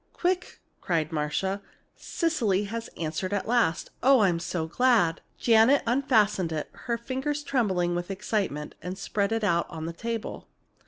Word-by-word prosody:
"Quick!" 360 Hz, 0 st, -1 dB, 0.2 s
cried 165 Hz, -3 st, 0 dB
Marcia. 165 Hz, +6 st, -1 dB, 0.3 s
"Cecily 230 Hz, -, 0 dB
has 225 Hz, +3 st, -5 dB
answered 170 Hz, +4 st, -3 dB
at 200 Hz, -, -1 dB
last! 230 Hz, -8 st, +1 dB
Oh, 265 Hz, -1 st, +6 dB
I'm 180 Hz, -5 st, +3 dB
so 170 Hz, -1 st, -2 dB
glad!" 205 Hz, -2 st, +2 dB, 0.2 s
Janet 230 Hz, +4 st, +5 dB
unfastened 225 Hz, -8 st, +2 dB
it, 155 Hz, -1 st, -4 dB
her 235 Hz, -1 st, -3 dB
fingers 265 Hz, +5 st, -3 dB
trembling 190 Hz, -11 st, +1 dB
with 175 Hz, +1 st, -3 dB
excitement, 195 Hz, -6 st, -2 dB
and 180 Hz, +3 st, -5 dB
spread 200 Hz, +1 st, -1 dB
it 225 Hz, -1 st, 0 dB
out 170 Hz, -4 st, +1 dB
on 160 Hz, -2 st, -6 dB
the 165 Hz, -, -4 dB
table. 230 Hz, +5 st, -5 dB
200 Hz, 150 wpm, -27 LUFS, 170-235 Hz, 0.3 s, Oh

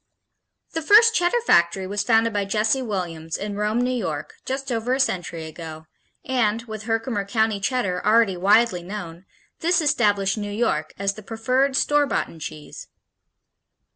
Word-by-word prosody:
The 325 Hz, -, -3 dB
first 435 Hz, +7 st, +6 dB
Cheddar 355 Hz, +5 st, +2 dB
factory 170 Hz, -, +3 dB
was 200 Hz, +2 st, -2 dB
founded 225 Hz, -1 st, +2 dB
by 205 Hz, -1 st, 0 dB
Jesse 215 Hz, +6 st, +1 dB
Williams 170 Hz, -8 st, -4 dB
in 205 Hz, 0 st, -5 dB
Rome, 210 Hz, +3 st, 0 dB
New 250 Hz, +1 st, 0 dB
York, 160 Hz, -11 st, -4 dB
just 270 Hz, 0 st, -4 dB
over 240 Hz, +2 st, 0 dB
a -, -, -4 dB
century 175 Hz, -9 st, -1 dB
ago 160 Hz, 0 st, -9 dB, 0.4 s
and, 230 Hz, -3 st, 0 dB
with 220 Hz, -2 st, -8 dB
Herkimer 225 Hz, -2 st, -1 dB
County 220 Hz, 0 st, 0 dB
Cheddar 200 Hz, -5 st, -1 dB
already 215 Hz, -2 st, +3 dB
widely 200 Hz, +1 st, +3 dB
known, 175 Hz, -2 st, -8 dB, 0.3 s
this 345 Hz, +2 st, +2 dB
established 205 Hz, -, +1 dB
"New 205 Hz, 0 st, -4 dB
York" 205 Hz, -9 st, -1 dB
as 195 Hz, 0 st, -1 dB
the 215 Hz, -, -11 dB
preferred 255 Hz, +6 st, 0 dB
"store 290 Hz, +1 st, +2 dB
boughten" 165 Hz, -, -3 dB
cheese. 155 Hz, -1 st, -8 dB
215 Hz, 155 wpm, -23 LUFS, 185-245 Hz, 0.4 s, first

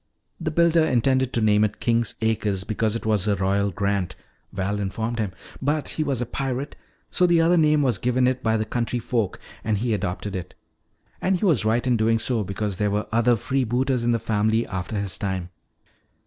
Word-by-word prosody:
"The 165 Hz, -2 st, -2 dB
builder 170 Hz, +1 st, +3 dB
intended 130 Hz, -2 st, +2 dB
to 120 Hz, -, +1 dB
name 105 Hz, -1 st, +4 dB
it 105 Hz, -1 st, -1 dB
'King's 115 Hz, 0 st, +1 dB
Acres' 105 Hz, -4 st, 0 dB
because 110 Hz, +1 st, -1 dB
it 115 Hz, -, -4 dB
was 105 Hz, -2 st, +1 dB
a 105 Hz, -, +3 dB
royal 100 Hz, +2 st, +1 dB
grant," 100 Hz, -1 st, -1 dB, 0.4 s
Val 100 Hz, +1 st, -2 dB
informed 110 Hz, +4 st, -3 dB
him. 105 Hz, -4 st, -1 dB, 0.3 s
"But 145 Hz, +2 st, 0 dB
he 155 Hz, -, -2 dB
was 135 Hz, -5 st, -1 dB
a -, -, 0 dB
pirate, 135 Hz, +3 st, -3 dB, 0.4 s
so 180 Hz, -, +3 dB
the 170 Hz, -1 st, +4 dB
other 165 Hz, +2 st, +4 dB
name 150 Hz, -3 st, +4 dB
was 125 Hz, -3 st, +1 dB
given 125 Hz, +1 st, +1 dB
it 130 Hz, 0 st, 0 dB
by 110 Hz, -1 st, +1 dB
the 110 Hz, -, -1 dB
country 120 Hz, +2 st, -2 dB
folk 115 Hz, -4 st, -1 dB, 0.2 s
and 110 Hz, -1 st, 0 dB
he 115 Hz, +2 st, 0 dB
adopted 100 Hz, 0 st, -3 dB
it. 90 Hz, -1 st, -6 dB, 0.7 s
And 190 Hz, 0 st, +2 dB
he 190 Hz, -, -1 dB
was 155 Hz, -, +3 dB
right 115 Hz, +3 st, +1 dB
in 125 Hz, -2 st, +2 dB
doing 115 Hz, +1 st, +2 dB
so 115 Hz, -1 st, 0 dB
because 100 Hz, 0 st, -3 dB
there 105 Hz, +1 st, +1 dB
were 105 Hz, +1 st, -1 dB
other 120 Hz, +2 st, +3 dB
freebooters 130 Hz, +1 st, 0 dB
in 120 Hz, -, +2 dB
the 115 Hz, -, +2 dB
family 110 Hz, 0 st, +1 dB
after 95 Hz, +2 st, -4 dB
his 100 Hz, -3 st, -3 dB
time." 95 Hz, -3 st, -3 dB
115 Hz, 205 wpm, -24 LUFS, 105-130 Hz, 0.7 s, name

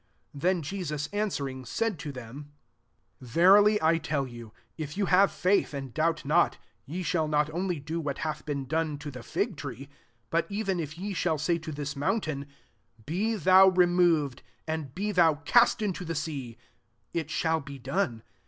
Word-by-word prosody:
21 140 Hz, -, -10 dB
Then 175 Hz, -, -4 dB
Je 190 Hz, +6 st, -4 dB
sus 150 Hz, -2 st, -3 dB
anaweringi 140 Hz, -, -3 dB
said 225 Hz, -7 st, -1 dB
to 145 Hz, -, -5 dB
Hky&E^ -, -, -14 dB
MATTHEW 125 Hz, +2 st, -8 dB
XXI. -, -, -9 dB
ST 145 Hz, -, -19 dB, 0.9 s
"Verily 205 Hz, +4 st, +6 dB
I 165 Hz, +1 st, +4 dB
tell 145 Hz, -4 st, -1 dB
you, 120 Hz, -3 st, -10 dB, 0.2 s
if 155 Hz, +1 st, -6 dB
ye 205 Hz, -, +1 dB
have 190 Hz, +2 st, +5 dB
faith, 185 Hz, -5 st, +1 dB
and 135 Hz, -3 st, -6 dB
doubt 160 Hz, -1 st, 0 dB
not, 165 Hz, +4 st, +3 dB, 0.3 s
ye 175 Hz, +6 st, -4 dB
shall 160 Hz, -2 st, 0 dB
not 150 Hz, 0 st, +1 dB
only 175 Hz, 0 st, -2 dB
do 155 Hz, +4 st, -4 dB
what 145 Hz, -3 st, -3 dB
hath 155 Hz, -1 st, -3 dB
been 140 Hz, -2 st, -3 dB
done 155 Hz, +1 st, -1 dB
to 145 Hz, 0 st, -7 dB
the 125 Hz, -2 st, -8 dB
fig 185 Hz, -, -2 dB
tree, 140 Hz, -1 st, -7 dB, 0.4 s
but 165 Hz, 0 st, +1 dB
even 200 Hz, -3 st, -1 dB
if 150 Hz, -1 st, -5 dB
ye 200 Hz, +3 st, -4 dB
shdl 160 Hz, -3 st, 0 dB
say 170 Hz, +3 st, +1 dB
to 160 Hz, 0 st, -7 dB
this 145 Hz, 0 st, -4 dB
mountain, 145 Hz, -2 st, -1 dB, 0.3 s
* 105 Hz, +2 st, -29 dB
Be 205 Hz, -, 0 dB
thou 190 Hz, 0 st, +7 dB
removed^ 175 Hz, -7 st, +3 dB, 0.3 s
and 155 Hz, -4 st, -4 dB
be 210 Hz, +3 st, -1 dB
thou 165 Hz, -5 st, +3 dB
east 235 Hz, -2 st, +6 dB
into 190 Hz, -3 st, -2 dB
the 165 Hz, -1 st, -4 dB
sea,' 140 Hz, -7 st, -4 dB, 0.6 s
it 165 Hz, -3 st, -2 dB
shall 160 Hz, 0 st, +1 dB
be 140 Hz, -1 st, -9 dB
done. 130 Hz, -, -2 dB
160 Hz, 190 wpm, -28 LUFS, 140-180 Hz, 0.9 s, thou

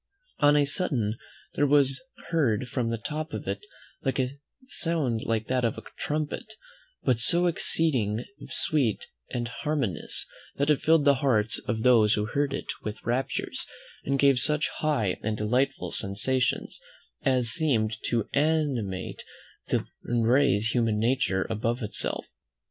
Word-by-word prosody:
On 145 Hz, 0 st, +5 dB
a 145 Hz, -1 st, +4 dB
sudden 130 Hz, -, 0 dB, 0.4 s
there 145 Hz, -, +2 dB
was 140 Hz, -1 st, +3 dB, 0.3 s
heard 130 Hz, -8 st, +1 dB
from 120 Hz, -1 st, -1 dB
the 115 Hz, -, -1 dB
top 155 Hz, +7 st, -5 dB
of -, -, -5 dB
it -, -, -2 dB, 0.4 s
a 130 Hz, -2 st, 0 dB, 0.4 s
sound 155 Hz, -, -1 dB
like 110 Hz, -1 st, 0 dB
that 125 Hz, +1 st, 0 dB
of 115 Hz, -, 0 dB
a -, -, -7 dB
trumpet, 155 Hz, +8 st, -3 dB, 0.5 s
but 120 Hz, -3 st, +2 dB
so 170 Hz, +9 st, +2 dB
exceeding 130 Hz, -10 st, +1 dB, 0.2 s
sweet 135 Hz, -9 st, +1 dB, 0.2 s
and 120 Hz, -1 st, -2 dB
harmonious, 125 Hz, -, -2 dB, 0.3 s
that 140 Hz, +2 st, +2 dB
it 150 Hz, -, +2 dB
filled 160 Hz, -2 st, +4 dB
the 140 Hz, -, +7 dB
hearts 115 Hz, -6 st, +2 dB
of 110 Hz, 0 st, -1 dB
those 115 Hz, -4 st, +5 dB
who 105 Hz, -, 0 dB
heard 140 Hz, +6 st, 0 dB
it -, -, -3 dB, 0.2 s
with 105 Hz, -1 st, -6 dB
raptures, 125 Hz, +3 st, +2 dB, 0.4 s
and 140 Hz, 0 st, 0 dB
gave 135 Hz, -2 st, +4 dB
such 150 Hz, +4 st, +1 dB
high 130 Hz, -12 st, 0 dB
and 110 Hz, 0 st, -2 dB
delightful 125 Hz, +6 st, 0 dB
sensations, 120 Hz, +7 st, 0 dB, 0.4 s
as 125 Hz, -3 st, +2 dB
seemed 120 Hz, -7 st, +1 dB
to 115 Hz, -3 st, 0 dB
animate 140 Hz, -11 st, 0 dB, 0.4 s
and 115 Hz, -1 st, -1 dB
raise 120 Hz, -4 st, +3 dB
human 115 Hz, -3 st, +1 dB
nature 110 Hz, -4 st, +1 dB
above 115 Hz, +3 st, -1 dB
itself. 105 Hz, -, 0 dB
125 Hz, 140 wpm, -27 LUFS, 110-145 Hz, 0.5 s, the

